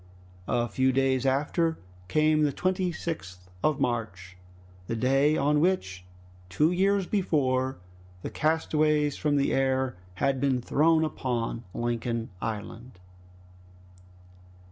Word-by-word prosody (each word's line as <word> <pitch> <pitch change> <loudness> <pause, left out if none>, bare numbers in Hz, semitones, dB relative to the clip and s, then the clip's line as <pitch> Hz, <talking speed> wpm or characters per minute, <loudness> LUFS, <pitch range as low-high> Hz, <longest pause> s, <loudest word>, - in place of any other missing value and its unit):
A 120 0 +1
few 130 +4 +1
days 135 0 +1
after 155 +5 +1 0.3
came 155 +6 +3
the 150 -1 +3
26th 170 - -2 0.3
of 155 -2 +2
March, 95 -8 -3 0.5
the 115 - -2
day 135 +5 +2
on 150 +2 +2
which, 95 - 0 0.4
two 150 - +2
years 195 +2 +2
before, 130 -10 0 0.5
the - - -5
castaways 155 -2 +1
from 150 -1 0
the 140 -1 +1
air 130 -1 +1 0.2
had 135 +5 0
been 135 -3 +2
thrown 160 +5 +3
upon 120 -5 -3
Lincoln 115 -1 -2
Island. 115 +1 -6
135 Hz, 110 wpm, -27 LUFS, 120-155 Hz, 0.5 s, came